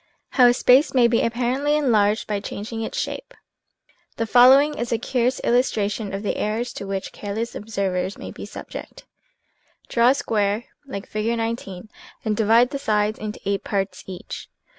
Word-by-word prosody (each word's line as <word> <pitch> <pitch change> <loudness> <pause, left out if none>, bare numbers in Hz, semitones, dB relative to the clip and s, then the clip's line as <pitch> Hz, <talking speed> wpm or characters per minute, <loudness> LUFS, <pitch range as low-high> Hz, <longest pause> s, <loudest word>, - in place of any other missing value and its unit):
HOW 250 -3 +5
A 240 - +5
SPACE 260 +3 +4
MAY 245 -2 +6
BE 235 -1 +2
APPARENTLY 250 +5 0
EN 285 -5 +1
LARGED 210 0 +2
BY 210 -2 -2
CHANGING 215 +3 -6
ITS 225 - -4
SHAPE - - -4 0.8
HE 230 - 0
following 260 +6 +6
is 235 - -4
a 230 - +2
curious 250 +2 0
illustration 215 -4 0
of 195 +2 -4
the 205 - -1
errors 225 +3 -2
to 200 - -7
which 195 -1 -4
careless 215 +3 -4
observers 195 -3 -2
may - - -8
be - - -9
subject: - - -9 0.8
Draw 235 0 +3
a 265 - +4
square, 210 -2 0 0.2
like 200 -6 -6
Fig. 220 +2 -1
19, 225 -4 -4 0.4
and 215 -1 +1
divide 230 +4 +4
the 280 - -3
sides 210 -3 0
into 215 0 -5
8 200 0 -1
parts 195 -1 -2
each. 185 -2 -8
225 Hz, 170 wpm, -23 LUFS, 205-245 Hz, 0.8 s, MAY